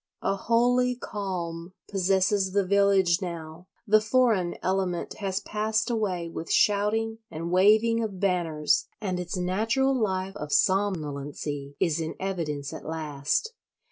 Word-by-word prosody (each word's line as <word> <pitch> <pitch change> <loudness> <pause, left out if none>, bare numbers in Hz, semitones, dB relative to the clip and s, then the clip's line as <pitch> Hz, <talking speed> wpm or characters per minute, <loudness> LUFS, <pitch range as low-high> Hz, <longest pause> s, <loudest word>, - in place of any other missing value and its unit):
A 195 - +1
holy 245 +4 +2
calm 180 -6 -5
possesses 190 0 +1
the 200 -1 +2
village 195 -2 +3
now; 170 -1 -7 0.2
the 215 -1 +5
foreign 220 -6 +2
element 185 -2 -1
has 195 -2 -1
passed 220 +2 -1
away 190 -7 -1
with 165 0 -6
shouting 220 +2 +2
and 165 +2 -5
waving 215 +5 +4
of 200 -4 -5
banners, 170 -6 +1
and 185 -4 -2
its 180 +1 -4
natural 220 +9 +1
life 195 -5 -1
of 150 - -6
somnolency 145 -7 -1
is 165 -2 +1
in 160 0 -3
evidence 160 -7 -3
at 160 - -8
last. 155 - -2
190 Hz, 130 wpm, -27 LUFS, 170-215 Hz, 0.2 s, the